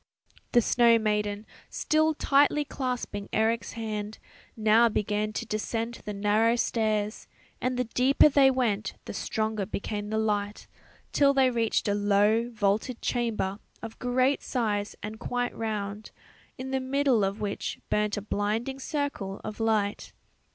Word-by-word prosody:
The 240 - +6
snow 235 0 +5
maiden, 210 -1 -1 0.2
still 310 0 +1
tightly 290 +1 +3
clasping 250 -7 -4
Eric's 225 +1 0
hand, 215 -1 -4 0.4
now 220 +2 +5
began 210 0 -1
to - - -3
descend 225 +2 -3
the 210 - -4
narrow 210 +3 +3
stairs, 215 -3 -1 0.3
and 255 0 -1
the 250 - +2
deeper 250 +5 +4
they 280 -2 +5
went 230 -6 0
the - - -6
stronger 215 +1 -2
became 205 +1 -4
the 220 - -1
light, 210 -1 -1 0.5
till 280 -1 +4
they 260 -2 +4
reached 230 -3 0
a 205 - +2
low 205 +3 +2
vaulted 220 +2 0
chamber 220 -5 -1 0.2
of 225 -1 -8
great 255 +2 +1
size 210 -5 -2
and 215 +1 -6
quite 245 0 -2
round, 210 -2 -4 0.5
in 265 +1 -6
the 265 - +1
middle 260 -3 +2
of 195 +2 -1
which 205 -1 -3
burnt 210 0 +1
a 205 - -4
blinding 215 +6 -2
circle 280 -10 -3
of 215 - -6
light. 215 -2 0
220 Hz, 145 wpm, -27 LUFS, 210-250 Hz, 0.5 s, The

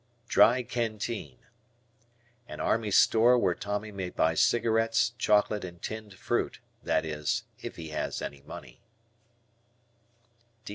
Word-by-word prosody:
Dry 120 +2 +5
Canteen. 115 -2 -3 1.1
An - - -8
army 115 -2 0
store 115 +5 +5
where 90 -7 +2
Tommy 105 +3 -4
may 95 -3 -4
buy 80 -2 +1
cigarettes, 115 +3 +2
chocolate, 105 0 +2
and 85 -1 -8
tinned 110 -1 -7
fruit, - - -2 0.2
that - - 0
is, 75 -2 -2 0.2
if - - -7
he 80 -1 -8
has 75 - -3
any 70 -1 -6
money. 70 - -11
105 Hz, 115 wpm, -29 LUFS, 90-115 Hz, 1.1 s, Dry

